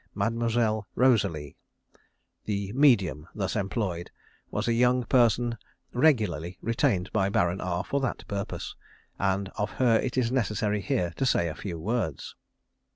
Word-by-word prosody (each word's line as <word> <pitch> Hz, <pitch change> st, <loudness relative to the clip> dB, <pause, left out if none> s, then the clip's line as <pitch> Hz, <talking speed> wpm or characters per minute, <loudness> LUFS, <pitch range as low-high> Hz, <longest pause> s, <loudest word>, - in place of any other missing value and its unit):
Mademoiselle 110 Hz, 0 st, 0 dB
Rosalie, 100 Hz, -, +2 dB, 0.9 s
"the 100 Hz, -2 st, -2 dB
medium" 115 Hz, -, +3 dB
thus 95 Hz, -3 st, -2 dB
employed, 95 Hz, -4 st, -2 dB, 0.4 s
was -, -, -2 dB
a 115 Hz, -, +3 dB
young 125 Hz, +1 st, +3 dB
person 120 Hz, -2 st, +2 dB, 0.3 s
regularly 105 Hz, -, +2 dB
retained 115 Hz, -5 st, 0 dB
by 100 Hz, -2 st, +2 dB
Baron 90 Hz, -1 st, +1 dB
R 90 Hz, 0 st, -1 dB
for 140 Hz, -, -1 dB
that 135 Hz, -, -3 dB
purpose, 100 Hz, -3 st, -4 dB, 0.4 s
and 95 Hz, 0 st, 0 dB
of 105 Hz, -, 0 dB
her 120 Hz, -3 st, +3 dB
it 130 Hz, 0 st, -3 dB
is 120 Hz, -2 st, +2 dB
necessary 105 Hz, -4 st, 0 dB
here 90 Hz, -1 st, 0 dB
to 135 Hz, -, +1 dB
say 85 Hz, -, +2 dB
a -, -, -4 dB
few 90 Hz, -1 st, -6 dB
words. 100 Hz, -, -3 dB
105 Hz, 140 wpm, -27 LUFS, 95-120 Hz, 0.9 s, medium